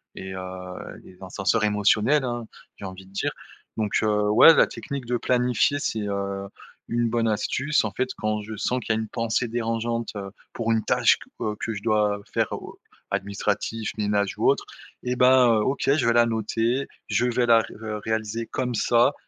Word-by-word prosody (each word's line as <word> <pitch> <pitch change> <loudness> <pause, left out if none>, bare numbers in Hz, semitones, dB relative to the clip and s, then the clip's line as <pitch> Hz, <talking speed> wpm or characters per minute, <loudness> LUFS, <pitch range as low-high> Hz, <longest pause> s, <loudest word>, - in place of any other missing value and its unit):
et 95 0 -7
heu, - - -5 0.6
les 90 - -16
ascenseurs 95 +4 0
émotionnels, 105 +7 +3
hein, 120 -2 -4 0.3
j'ai 100 - -8
envie 95 0 -8
de 95 - -19
dire, 100 - -1 0.5
donc 105 -2 -1
heu, 105 -1 +2
ouais, 115 +10 +8
la - - +5
technique 140 -3 -6
de 125 - -1
planifier 125 +3 +1
c'est, 110 -5 -2
heu, 100 -1 -3 0.4
une 120 0 +1
bonne 115 -1 +1
astuce, 130 +5 0
en 105 - -2
fait, 130 +6 -2
quand 110 -1 -1
je 110 0 -7
sens 125 - 0
qu'il 110 - 0
y - - 0
a - - -1
une 110 - -4
pensée 115 +1 -1
dérangeante, 115 0 -2
heu, 100 -1 -6 0.2
pour 115 -1 -2
une 110 - +1
tâche - - +4
que, - - -15 0.2
heu, 105 - -6
que 115 - -3
je 100 - -6
dois 105 -2 +2
faire - - +2
ou, - - -6
heu, - - -16 0.4
administratif, 100 +2 -2
ménage 100 -1 0
ou - - +1
autre - - +2 0.4
et 125 0 -1
bah, 125 0 +6
heu, 115 -2 +4
OK, 135 +5 -1
je 135 - +1
vais 115 - +4
la 120 0 +5
noter, 115 +3 -1 0.2
je 120 - +1
vais 120 0 +1
la 115 -1 +7
ré - - -10 0.2
re 105 - -6
réaliser 110 +1 -2
comme 125 -2 -2
ça, 120 +5 +3
110 Hz, 200 wpm, -25 LUFS, 105-120 Hz, 0.6 s, ouais